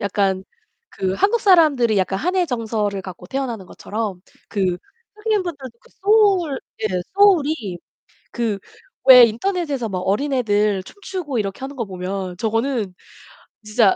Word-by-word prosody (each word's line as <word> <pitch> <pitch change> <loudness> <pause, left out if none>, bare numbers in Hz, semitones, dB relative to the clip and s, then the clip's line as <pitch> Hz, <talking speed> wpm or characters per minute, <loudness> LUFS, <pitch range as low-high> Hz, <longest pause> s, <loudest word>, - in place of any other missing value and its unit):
약간 195 -1 0 0.5
그 190 0 -2
한국 415 - +2
사람들이 300 - +4
약간 190 +1 0
한의 360 - +1
정서를 220 -6 -2
갖고 185 -2 -10
태어나는 245 -8 -4
것처럼 205 -1 -5 0.3
그 185 -4 0 0.4
흑인분들도 350 - -3
그 - - -23
소울 390 -8 +3 0.2
예 215 - +1 0.3
소울이 310 - +3 0.5
그 225 -4 -2 0.5
왜 250 -2 +11
인터넷에서 275 - -1
막 185 -3 -3
어린애들 210 -2 +1
춤추고 355 - -5
이렇게 195 -2 -3
하는 270 +2 -6
거 235 -5 -3
보면 185 0 -5
저거는 225 -2 -1 0.7
진짜 215 -1 +3
230 Hz, 285 characters per minute, -21 LUFS, 195-310 Hz, 0.7 s, 왜